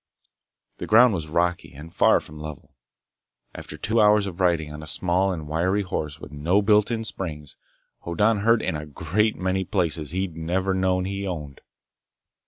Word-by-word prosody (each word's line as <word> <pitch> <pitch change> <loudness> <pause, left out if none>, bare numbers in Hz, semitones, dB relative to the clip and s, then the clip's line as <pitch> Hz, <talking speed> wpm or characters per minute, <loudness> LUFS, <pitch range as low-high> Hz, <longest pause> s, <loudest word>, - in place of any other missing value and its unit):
The - - -5
ground 120 +1 +6
was 80 -4 -3
rocky 85 +2 -1
and 80 +4 -11
far - - +4
from 75 0 -11
level. 75 -2 -9 0.8
After - - -9
two 110 +1 +1
hours 105 -1 +5
of 95 -2 -7
riding 85 -5 +1
on 75 - -8
a 80 - -9
small 90 +4 +1
and 80 -4 -5
wiry 90 +6 0
horse 75 -5 -4
with 75 - -10
no 85 +8 +1
built 105 0 +4
in 115 -2 -2
springs, 75 -9 -6 0.4
Hoddan 105 +6 +1
hurt 115 +2 +3
in - - -1
a 75 0 -6
great 95 +9 0
many 95 +1 -1
places 85 -6 -1
he'd 90 -1 -3
never 90 +4 -1
known 95 -1 +1
he 100 +1 -4
owned. 75 -6 -6
90 Hz, 175 wpm, -24 LUFS, 80-100 Hz, 0.8 s, ground